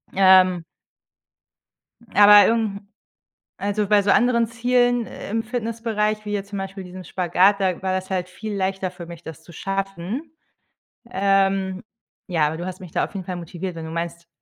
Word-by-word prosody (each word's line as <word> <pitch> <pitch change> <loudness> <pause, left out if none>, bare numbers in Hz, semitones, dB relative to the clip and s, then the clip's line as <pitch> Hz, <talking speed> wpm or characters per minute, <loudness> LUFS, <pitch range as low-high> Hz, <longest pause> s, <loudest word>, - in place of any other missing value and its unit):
Ähm 185 -2 +5 1.5
Aber 205 +1 +8
irgend 220 -3 0
'n 200 - -28 0.7
also, 205 +1 -1
bei 205 -1 +4
so 200 - +1
anderen 235 -2 +3
Zielen 245 0 +1
im 225 +3 -4
Fitnessbereich, 220 -2 -2
wie 210 - -3
jetzt 200 -1 -3
zum 200 - -4
Beispiel 195 0 -6
diesen 185 +1 -10
Spagat, 185 +4 +2
da 185 -3 0
war 190 - -1
das 185 +1 -4
halt 180 -1 -2
viel 210 +3 -6
leichter 190 -1 -2
für 180 -1 -10
mich, 170 0 -10
das 160 -3 -10
zu - - -16
schaffen. 195 - -4 0.8
Ähm, 195 -1 +1 0.4
ja, 165 -5 +1
aber 155 +2 -2
du 175 - -5
hast 185 -1 -7
mich 180 -3 -10
da - - 0
auf - - -6
jeden 190 -2 -5
Fall 180 0 -4
motiviert, 175 +2 -6
wenn 165 -1 -7
du 160 - -7
meinst, 170 0 -5
195 Hz, 175 wpm, -22 LUFS, 180-210 Hz, 1.5 s, Aber